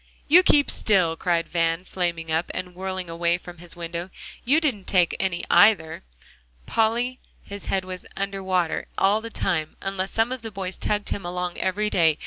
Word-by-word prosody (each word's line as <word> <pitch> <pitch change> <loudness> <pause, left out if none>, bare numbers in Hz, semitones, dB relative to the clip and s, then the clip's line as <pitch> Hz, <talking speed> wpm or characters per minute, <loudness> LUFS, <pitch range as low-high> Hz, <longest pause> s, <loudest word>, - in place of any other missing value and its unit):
"You 340 +5 +8
keep 290 -5 +4
still," 180 -6 +2
cried 170 -1 0
Van, 165 +1 0
flaming 170 -3 -2
up, 160 +2 0
and 180 -1 -4
whirling 185 0 -4
away 170 +1 0
from 175 -1 -12
his 175 0 -9
window. 170 +1 -5 0.3
"You 285 +6 +4
didn't 255 - -1
take 180 -3 +3
any, 190 -3 -1
either. 175 -7 +5 0.6
Polly, 235 - +1 0.2
his 200 0 -9
head 190 -1 -1
was 185 -1 -7
under 195 0 -2
water 185 -3 0
all 205 +3 +3
the 230 - -6
time, 160 -8 -1
unless 195 0 -3
some 225 +4 +1
of 255 -2 -4
the 225 - -5
boys 195 -2 -6
tugged 205 -1 -1
him 200 - -3
along 180 0 -3
every 210 +3 0
day. 160 -3 +4
185 Hz, 180 wpm, -24 LUFS, 170-205 Hz, 0.6 s, You